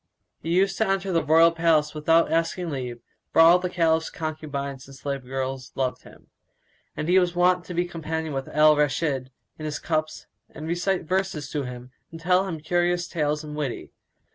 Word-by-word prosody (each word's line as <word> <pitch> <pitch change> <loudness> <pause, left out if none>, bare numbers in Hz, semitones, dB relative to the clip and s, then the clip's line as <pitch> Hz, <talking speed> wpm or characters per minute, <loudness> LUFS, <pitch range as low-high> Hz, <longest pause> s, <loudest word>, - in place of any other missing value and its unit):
He 165 - -5
used 190 +2 +2
to 220 - +2
enter 195 0 0
the 165 -2 +1
royal 165 +2 +5
palace 165 -2 +2
without 165 +2 +3
asking 165 +1 0
leave, 125 -4 -5 0.3
for - - +2
all 170 +2 +8
the 180 0 -3
Caliph's 165 -2 +1
concubines 140 -4 -5
and 135 - -12
slave 140 0 -4
girls 130 0 -4
loved 130 -2 -1
him, - - -17 0.7
and 155 - -3
he 180 +2 +5
was 180 -1 0
wont 180 0 +3
to 180 - -7
be 175 +1 +1
companion 160 -2 -4
with 135 0 -3
Al 150 0 +5
Rashid 145 -2 0 0.3
in 155 - -6
his 150 -1 -3
cups 155 -1 -2 0.2
and 155 - -9
recite 175 +3 0
verses 180 -4 -2
to 145 -3 -2
him 125 0 -9 0.2
and 165 - -10
tell 180 +3 +2
him 165 -4 -4
curious 175 +2 0
tales 150 -2 -1
and 150 -1 -7
witty. 145 -5 -4
160 Hz, 190 wpm, -25 LUFS, 145-175 Hz, 0.7 s, all